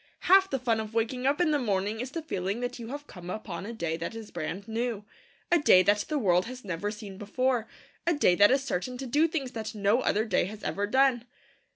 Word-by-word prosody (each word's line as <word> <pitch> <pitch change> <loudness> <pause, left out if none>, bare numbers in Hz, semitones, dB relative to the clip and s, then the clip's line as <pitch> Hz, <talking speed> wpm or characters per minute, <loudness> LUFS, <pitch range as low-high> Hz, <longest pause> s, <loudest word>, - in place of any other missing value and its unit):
Half 385 +1 +5
the 270 - 0
fun 235 -3 0
of 220 0 -6
waking 250 +3 0
up 285 +3 +2
in 345 -3 +3
the 295 - +2
morning 210 -2 -1
is 250 +2 -3
the 325 +4 -5
feeling 195 - -2
that 245 0 -4
you 230 - -7
have 290 +4 -6
come 180 -7 -10
upon 195 -2 -5
a - - -5
day 170 -8 -3
that 170 +7 -5
is 225 -2 -8
brand 175 +4 -5
new, 225 -2 -2 0.5
a 345 - +5
day 185 -10 +6
that 205 +2 +2
the 305 - 0
world 185 -6 +2
has 255 -2 -9
never 185 +2 -3
seen 210 -2 -8
before, 240 +2 0 0.4
a 345 - +3
day 290 -11 +4
that 205 +3 +6
is 270 +1 +2
certain 250 +2 -3
to 270 - -5
do 295 +6 +3
things 285 -6 -3
that 220 -1 -5
no 210 +4 +2
other 215 -3 +1
day 220 - +1
has 210 +3 -8
ever 205 +1 -1
done. 260 0 +3
225 Hz, 240 wpm, -28 LUFS, 200-260 Hz, 0.5 s, day